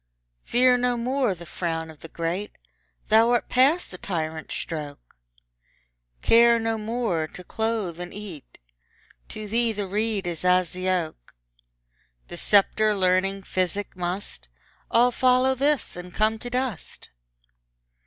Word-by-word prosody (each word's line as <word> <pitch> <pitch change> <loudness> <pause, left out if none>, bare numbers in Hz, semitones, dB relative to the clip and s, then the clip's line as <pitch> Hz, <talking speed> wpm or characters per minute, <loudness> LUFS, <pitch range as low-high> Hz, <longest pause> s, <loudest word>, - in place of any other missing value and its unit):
Fear 250 +1 +4
no 245 0 +1
more 250 -3 0
the 170 0 -11
frown 165 -1 -3
of 155 - -17
the - - -10
great, 170 +5 -3 0.6
Thou 225 +2 +5
art 240 -1 +1
past 280 +8 +3
the 180 - -9
tyrant's 160 -3 -4
stroke: 145 - -6 1.1
Care 235 0 +6
no 225 -1 -1
more 215 -8 -1
to 180 - -11
clothe 220 -4 -2
and 180 0 -6
eat; 195 -8 -10 0.7
To 215 -1 -7
thee 230 +2 +1
the 205 -2 -3
reed 210 0 -1
is 175 -1 -4
as 180 -1 +3
the 185 +1 -3
oak: 160 - -3 0.9
The 175 - -8
sceptre, 210 +3 +3
learning, 190 +1 +1
physic, 185 +2 -2
must 180 - -5 0.4
All 245 +2 +4
follow 255 +1 +3
this, 280 +2 0
and 180 0 -8
come 215 +3 +1
to 245 - -7
dust. 250 -7 -4
205 Hz, 135 wpm, -25 LUFS, 175-235 Hz, 1.1 s, Care